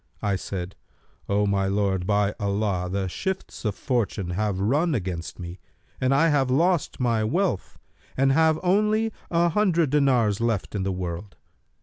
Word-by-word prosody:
I 100 -1 +1
said, 95 0 -5 0.5
'O 100 +1 +2
my 100 -1 +1
lord, 95 -2 0
by 105 -1 +2
Allah, 100 -3 -1
the 95 0 -1
shifts 190 - -4
of 105 -2 0
fortune 110 -8 -1
have 100 +1 -1
run 145 - +1
against 90 -6 -4
me 90 +1 -8 0.4
and 130 +1 +1
I 150 +5 +4
have 140 -4 +2
lost 165 +5 +1
my 115 -3 +1
wealth 165 - -1 0.4
and 135 +1 +3
have 160 +2 +3
only 215 +4 +2 0.2
an 170 0 +2
hundred 170 -6 +2
dinars 125 -8 +2
left 115 -4 -1
in 100 - -2
the 95 +1 -1
world.' 90 +1 -5
110 Hz, 155 wpm, -25 LUFS, 95-155 Hz, 0.5 s, I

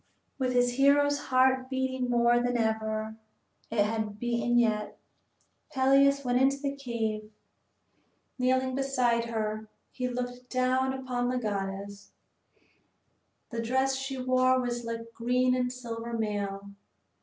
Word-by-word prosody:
II - - -43 0.3
With 255 -1 0
his 245 0 +2
hero's 285 +1 +4
heart 260 0 +3
beating 260 -1 -1
more 240 0 +4
than 245 0 0
ever 220 -1 -1 0.5
it 215 -2 +2
had 215 -1 -3
beaten 240 +1 0
yet, 215 -3 +1 0.7
Peleus 275 0 +4
went 245 0 +2
into 275 +1 +3
the 280 0 -3
cave. 225 -5 -3 1.1
Kneeling 260 +1 +1
beside 255 -3 +1
her 215 -1 -3 0.2
he 250 -1 -3
looked 250 0 -5
down 255 +1 +1
upon 255 -2 -2
the 255 - 0
goddess. 200 -2 -4 1.4
The 230 -1 -2
dress 265 +3 +1
she 270 0 -4
wore 255 0 +3
was 240 -1 -3
like 230 0 -6
green 250 +2 +1
and 250 -1 0
silver 235 -2 -6
mail. 200 -3 -3
245 Hz, 130 wpm, -29 LUFS, 225-260 Hz, 1.4 s, hero's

